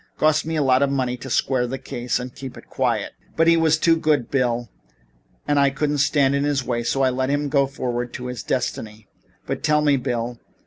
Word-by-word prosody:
Cost 155 0 +2
me 165 - -2
a 150 - +2
lot 130 0 +3
of 140 - +3
money 130 -2 -1
to 130 +2 -8
square 125 0 +1
the 135 +2 -4
case 125 -2 -3
and 125 0 -7
keep 135 -2 -8
it - - -12
quiet. - - 0 0.3
But 165 - +4
he 170 0 +6
was 160 -1 +3
too 165 +1 +4
good, 150 -7 0
Bill, 120 -3 0 0.8
and 145 -1 +2
I 140 0 +5
couldn't 145 +1 -1
stand 140 -1 +3
in 140 0 +1
his 145 -2 0
way; 120 -2 -1
I 135 -1 +2
let 130 +1 -1
him 145 0 0
go 140 -1 +3
forward 125 -3 -3
to 125 - -6
his 125 -2 -5
destiny. 110 -3 -3 0.4
But - - -3
tell 150 0 +2
me, 145 -2 +4
Bill. 120 -2 -3
135 Hz, 220 wpm, -22 LUFS, 125-145 Hz, 0.8 s, he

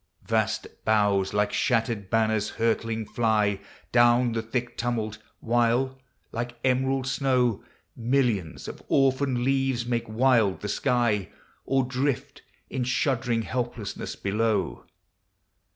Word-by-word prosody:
Vast 110 -1 0 0.2
boughs 105 -3 +2
like 105 0 +1
shattered 115 -5 0
banners 110 -1 +1
hurtling 115 -1 0
fly 105 -2 +1 0.3
Down 120 0 +4
the 115 0 -1
thick 120 +2 -3
tumult: 110 -3 -2 0.2
while, 120 +3 +1 0.3
like 120 +1 -4
emerald 130 +1 +1
snow. 125 -4 +1 0.3
Millions 115 -8 0
of - - -8
orphaned 135 -2 +2
leaves 135 -2 +1
make 120 -2 -2
wild 115 -4 +3
the 105 - -4
sky, 110 -3 +1 0.4
Or 135 0 +2
drift 130 +1 -2 0.3
in 130 - -2
shuddering 125 -2 0
helplessness 120 -4 -4
below. 105 +1 -1
120 Hz, 110 wpm, -26 LUFS, 110-125 Hz, 0.4 s, Down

